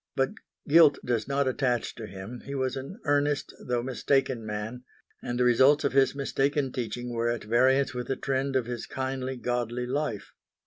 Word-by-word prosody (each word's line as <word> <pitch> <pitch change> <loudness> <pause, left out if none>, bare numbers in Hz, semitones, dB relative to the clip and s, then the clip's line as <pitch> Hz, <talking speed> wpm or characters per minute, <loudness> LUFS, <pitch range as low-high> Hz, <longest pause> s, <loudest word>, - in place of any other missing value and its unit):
But 135 0 +1 0.4
guilt 155 -1 +7
does 120 -3 0
not 140 0 +1
attach 125 -2 0
to 110 -2 -8
him. 95 +5 -8
He 140 - -5
was 130 -1 -1
an 135 - -7
earnest, 145 -1 +1
though 120 -1 -1
mistaken 130 -1 0
man, 110 +3 -5 0.4
and 120 0 -3
the - - +4
results 130 +4 +5
of 140 - 0
his 135 0 +4
mistaken 140 0 0
teaching 120 0 -4
were 120 0 0
at 120 -1 -2
variance 130 +4 +3
with 125 -1 -4
the 135 - 0
trend 135 0 -1
of 130 -3 +2
his 120 -1 -5
kindly, 130 0 -3
godly 120 0 -2
life. 130 -4 -3
130 Hz, 180 wpm, -28 LUFS, 120-135 Hz, 0.4 s, guilt